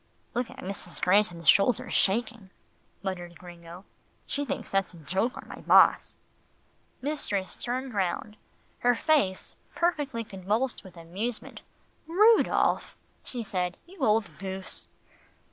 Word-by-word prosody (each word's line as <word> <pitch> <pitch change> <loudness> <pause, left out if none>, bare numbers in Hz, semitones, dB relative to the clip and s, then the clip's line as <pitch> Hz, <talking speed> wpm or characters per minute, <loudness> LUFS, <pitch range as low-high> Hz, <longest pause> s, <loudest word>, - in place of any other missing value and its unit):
"Look 245 0 -1
at - - -12
Mrs. 185 -2 -6
Granton's 180 -4 +2
shoulders 210 +3 +4
shaking," 220 0 +2 0.5
muttered 175 -3 -5
Gringo. 175 +1 -12 0.4
"She 285 - -2
thinks 285 - -4
that's 195 -2 0
a - - -12
joke 190 - -1
on - - -9
my - - -9
boss." - - +5 0.9
Mistress 210 -10 -2
turned 255 +1 -3
round 195 +2 -1 0.4
her 245 0 +3
face 230 -10 +1 0.2
perfectly 295 -9 0
convulsed 210 +6 -2
with 185 -2 -14
amusement. 195 +8 -5 0.5
"Rudolph," 425 +7 +3 0.3
she 245 -2 -5
said, 180 -3 -2
"you 365 +2 -16
old 220 -5 +2
goose." 190 0 -5
200 Hz, 120 wpm, -28 LUFS, 185-245 Hz, 0.9 s, boss